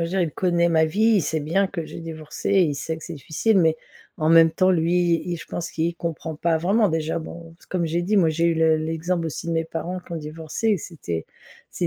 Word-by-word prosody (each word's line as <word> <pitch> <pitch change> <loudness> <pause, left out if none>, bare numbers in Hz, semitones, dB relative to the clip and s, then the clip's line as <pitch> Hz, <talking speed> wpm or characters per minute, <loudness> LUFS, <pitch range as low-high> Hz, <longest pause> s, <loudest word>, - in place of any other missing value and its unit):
veux 165 - -1
dire 190 +2 0
il 165 - -1
connaît 175 -1 +2
ma 160 -1 +4
vie. 220 +8 +3
Il - - +2
sait 160 +2 -1
bien 170 +6 +1
que 170 -5 -5
j'ai - - -8
divorcé, 160 +3 -4
il 175 -7 +3
sait 160 +3 -4
que 160 - -10
c'est 170 - -7
difficile 160 - 0
mais 160 -2 +3 0.4
en 155 0 +2
même 165 0 +7
temps 185 +3 +2
lui 170 0 +2
il 175 -1 -3
je - - -10
pense 170 - -5
qu'il 165 +1 -1
comprend 165 -2 -4
pas 165 +1 +1
vraiment. 200 +6 +2
Déjà, 160 0 -1
bon, 165 0 -10
c'est - - -22
comme 175 -3 -1
j'ai 170 +2 -1
dit 205 +4 +1
moi 170 -5 +4
j'ai 165 +2 +1
eu 170 - +2
le 160 -1 +4
l'exemple 165 +2 -2
aussi 160 +1 -5
de 170 - -1
mes 165 0 +1
parents 165 +3 -5
qui 180 - -21
ont - - -2
divorcé 160 +7 -3
et 210 - +3
c'était 145 - -5 0.5
c'est - - -2
165 Hz, 255 wpm, -23 LUFS, 160-175 Hz, 0.5 s, même